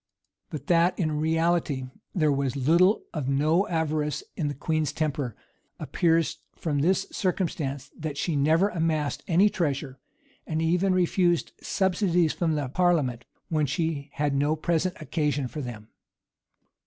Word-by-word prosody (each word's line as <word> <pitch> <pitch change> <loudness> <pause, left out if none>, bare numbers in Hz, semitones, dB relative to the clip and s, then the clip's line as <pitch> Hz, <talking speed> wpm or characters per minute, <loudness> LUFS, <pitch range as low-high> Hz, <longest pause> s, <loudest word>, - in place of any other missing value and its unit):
But 145 -2 -6
that 175 +2 +3
in 155 -4 0
reality 160 -3 +1 0.3
there 155 -5 +3
was 140 -1 0
little 170 - +3
of 145 -5 -2
no 155 +8 +2
avarice 155 -4 -1
in 150 - -1
the 145 - -3
queen's 155 0 -1
temper, 145 -7 -2 0.4
appears 165 +2 +1 0.2
from 150 -4 -1
this 180 +7 +2
circumstance, 150 -7 -2
that 155 -3 -4
she 160 +2 -1
never 160 +7 +3
amassed 160 -5 -1
any 185 +4 +5
treasure; 140 -8 -2 0.5
and 155 -1 -1
even 180 +4 +2
refused 175 -1 +2
subsidies 180 -4 +1
from 165 -3 0
the 145 -3 -1
parliament 140 -6 +1 0.2
when 155 -3 +1
she 145 0 -2
had 145 -1 0
no 145 +3 +2
present 170 +3 -1
occasion 150 -2 -1
for 150 +4 -6
them. 115 -4 -8
155 Hz, 140 wpm, -26 LUFS, 145-170 Hz, 0.5 s, any